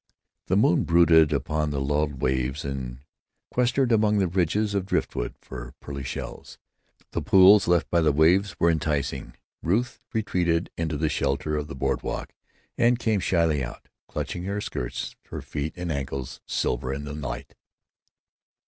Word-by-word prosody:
The - - +2
moon - - +4
brooded 80 -2 +5
upon 75 +1 0
the 70 -1 -2
lulled 75 0 -1
waves, 65 +2 0
and 65 -2 -5 0.5
quested 125 +1 +2
among 105 -1 +3
the 95 -2 +2
ridges 95 +4 +1
of 95 -2 -1
driftwood - - -1
for 65 -1 -9
pearly 70 -1 -6
shells. 65 - -7 0.5
The - - -2
pools 95 +2 +7
left 85 -1 +3
by 85 - +4
the 80 -2 +4
waves 85 +7 +3
were 85 - +4
enticing. 70 -4 -2 0.3
Ruth 110 +9 0
retreated 90 -6 0
into 80 -2 -2
the 80 +2 +1
shelter 75 +1 0
of 75 -1 -2
the 70 - -7
board 65 - -1
walk - - -5 0.5
and 120 +1 +4
came 110 -3 +1
shyly 85 -6 +2
out, - - -8 0.2
clutching 90 0 -4
her 100 +2 -2
skirts, 60 -9 -4
her - - -7
feet 75 +2 -4
and 90 -1 -3
ankles 70 -2 -4
silver 65 +1 -1
in 70 +2 -4
the 75 - -6
light. 65 -5 -6
80 Hz, 155 wpm, -26 LUFS, 70-95 Hz, 0.5 s, pools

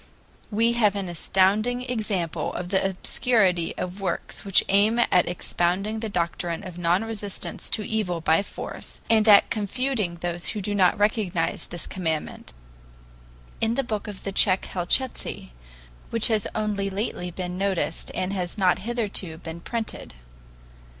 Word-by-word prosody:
We 230 +2 +3
have 215 -4 +3
an 195 -2 -2
astounding 200 +8 +2
example 200 - -2
of 175 0 -4
the 190 0 +2
obscurity 190 -2 +2
of 180 +2 -5
works 185 -3 -2
which 195 -2 +4
aim 205 +4 +3
at 180 -8 +3
expounding 185 +4 -1
the 220 -1 -3
doctrine 170 -2 -2
of 180 -1 -8
non 175 +4 +2
resistance 210 -3 -5
to 215 - -1
evil 200 -6 -1
by 160 +1 +3
force, 200 - -5
and 220 -1 +5
at 205 -2 +7
confuting 215 -3 -1
those 175 0 -1
who - - -1
do 205 +1 -2
not 185 -3 +4
recognize 205 -5 0
this 175 -2 -5
commandment, 160 -5 -3 1.1
in 225 +1 +2
the 275 - +1
book 215 -3 -3
of 205 -2 -8
the 195 - -3
Tsech 190 0 +3
Helchitsky, 180 - -1 0.6
which 230 0 +4
has 215 -3 +1
only 210 -2 -1
lately 195 -2 -3
been 180 0 -5
noticed 190 -3 -1
and 185 +2 -1
has 180 0 -3
not 185 -3 +3
hitherto 205 -7 -3
been 165 0 -7
printed. 225 - -5
195 Hz, 150 wpm, -25 LUFS, 175-215 Hz, 1.1 s, at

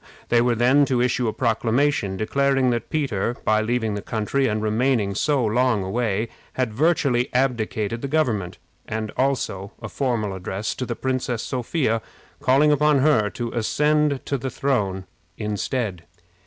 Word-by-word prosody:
They 120 -1 +4
were 120 0 +2
then 125 +5 +4
to 130 -3 0
issue 125 0 +1
a - - +1
proclamation 115 -2 0
declaring 135 +3 +2
that 120 -1 -3
Peter, 120 -7 -1
by 110 0 +3
leaving 115 -1 0
the 100 - -3
country 115 +6 -1
and 110 0 0
remaining 110 -1 +1
so 135 +4 +1
long 115 -1 +2
away, 110 +2 -1 0.2
had 125 -4 -1
virtually 135 -3 +2
abdicated 115 -3 0
the 140 - -3
government; 110 - 0 0.3
and 110 -1 -3
also 115 -7 -1
a 110 - -7
formal 115 -7 -1
address 95 +3 -3
to 125 - -5
the 120 - -3
Princess 130 -3 -2
Sophia, 125 -2 -1 0.4
calling 140 +4 +4
upon 150 0 +4
her 130 -8 +3
to 120 +2 -5
ascend 150 +4 +1
the 135 -1 -2
throne 100 -10 -1 0.3
in 105 0 -3
his 100 -3 -2
stead. 105 -10 -2
120 Hz, 155 wpm, -23 LUFS, 110-135 Hz, 0.4 s, They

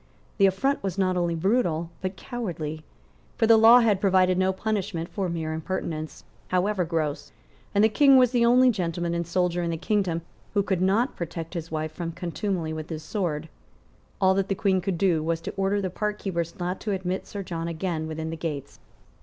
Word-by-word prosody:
The 195 - +7
affront 270 +9 0
was 195 -2 -3
not 185 -1 +2
only 175 -1 0
brutal, 170 -3 0
but 185 0 -3
cowardly. 165 - -5 0.5
For 225 - +3
the 225 0 +7
law 225 +3 +8
had 210 -5 +2
provided 185 -2 +4
no 190 +1 +2
punishment 190 -4 -2
for 195 -3 -2
mere 160 -2 -3
impertinence, 160 -1 -4 0.2
however 185 +1 +1
gross; 160 -3 -2 0.4
and 200 - +5
the - - +7
King 275 +4 +6
was 250 -2 +5
the 240 -2 +3
only 250 +2 +6
gentleman 175 -4 -2
and 170 -1 -2
soldier 175 0 0
in 170 - -1
the 165 - -2
kingdom 180 -2 0 0.3
who 200 - +3
could 190 -2 -1
not 205 +8 +2
protect 165 -1 -5
his 165 -2 -5
wife 155 0 -3
from 165 +1 -5
contumely 175 -1 -3
with 155 0 -6
his 160 -2 -5
sword. 165 -5 -2 0.7
All 190 -1 +4
that 195 0 0
the 195 - 0
Queen 190 -2 +1
could 190 -1 -2
do 170 -4 +2
was 165 +1 -1
to - - -5
order 195 +1 +1
the 190 -2 -2
parkkeepers 190 -5 -3
not 180 +1 -3
to 210 - -2
admit 185 0 -3
Sir 200 -1 -5
John 170 -2 -4
again 165 -1 -3
within 160 0 -4
the - - -3
gates. 145 -4 -5
180 Hz, 195 wpm, -26 LUFS, 165-200 Hz, 0.7 s, law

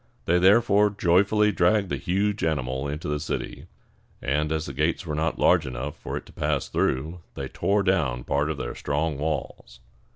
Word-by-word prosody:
They 90 +1 +3
therefore 105 +2 +5
joyfully 100 +2 +3
dragged 95 +1 +2
the - - -1
huge 100 +3 -1
animal 65 -3 -1
into 75 +3 -5
the 75 0 -1
city; 75 - -5 0.5
and, 75 +3 -1
as 80 0 -1
the 70 - -6
gates 75 +6 0
were 75 - -4
not 80 +1 -1
large 85 -5 +3
enough 65 +3 -5
for - - -5
it - - -7
to - - -16
pass - - -1
through, 80 +7 -1 0.2
they 70 - -4
tore 100 0 +1
down 75 -11 +1
part 75 +4 0
of 80 - -3
their - - -4
strong 75 0 -2
walls. 80 +2 -4
80 Hz, 185 wpm, -25 LUFS, 70-95 Hz, 0.5 s, therefore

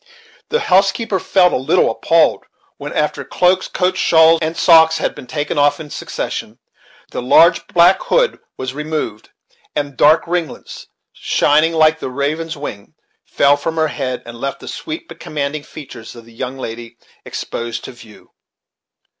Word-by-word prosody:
The 470 - 0
housekeeper 195 +2 +2
felt 180 -1 +3
a - - +2
little 130 - +2
appalled, - - +2 0.3
when, - - -7
after - - -1
cloaks, 180 +1 +1
coats, 185 0 -1
shawls, 160 0 +5
and 160 +1 -2
socks 160 -1 +5
had - - -2
been 125 - -11
taken 145 0 -2
off 145 +1 +3
in 150 -2 -9
succession, - - -5 0.5
the - - -4
large 165 +7 +4
black 175 +2 +4
hood - - +1 0.2
was 130 0 -4
removed, 150 -7 -4 0.5
and 145 -1 -2
the 135 - -26
dark 155 +2 +5
ringlets, 170 -3 -5 0.3
shining 155 +3 +2
like 160 0 +3
the - - -5
raven's 150 +5 -3
wing, 105 -8 -8 0.3
fell 140 0 +3
from 160 +3 -4
her 160 -1 +1
head, 130 -3 -4
and 120 0 -10
left 140 - -3
the - - -12
sweet 325 0 -6
but - - -12
commanding 150 0 -4
features 140 -7 -11
of 115 -1 -13
the 115 - -17
young 130 +3 -5
lady 115 -2 -8 0.3
exposed 115 -1 -5
to - - -8
view. 115 -4 -17
155 Hz, 165 wpm, -17 LUFS, 130-165 Hz, 0.5 s, shawls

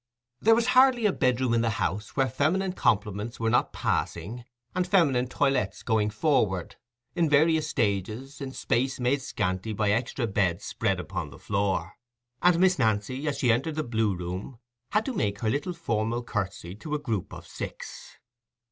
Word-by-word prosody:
There 225 +1 +5
was 235 +2 +1
hardly 255 -3 +5
a 205 - +3
bedroom 125 -1 +1
in 115 - +3
the 115 - +1
house 105 +4 -2
where 135 -1 +3
feminine 180 +8 0
compliments 105 - 0
were 115 0 +1
not - - +2
passing 110 +9 -2 0.3
and 180 0 0
feminine 145 -10 +3
toilettes 125 -6 0
going 110 -3 +1
forward, 105 - 0 0.4
in 170 -3 +2
various 155 +1 +4
stages, 110 +7 -2
in 135 -1 -4
space 130 +1 -1
made 130 +3 +1
scanty 105 -4 -2
by 105 0 +1
extra 120 +3 0
beds 95 -5 0
spread - - -1
upon - - -4
the - - -13
floor; 95 -2 -1 0.4
and 180 -1 +5
Miss 185 -3 +4
Nancy, 115 +5 0
as 145 - -1
she 125 - +3
entered 135 +7 0
the 155 - -1
Blue 110 -5 0
Room, 90 +7 -6 0.3
had 210 +1 +1
to 265 - -2
make 100 - -1
her 110 - +1
little 150 +7 -2
formal 115 -7 -1
curtsy 100 -6 -4
to 150 +6 -4
a - - -1
group 115 -10 -3
of - - -9
six. - - -8
120 Hz, 175 wpm, -27 LUFS, 105-150 Hz, 0.4 s, There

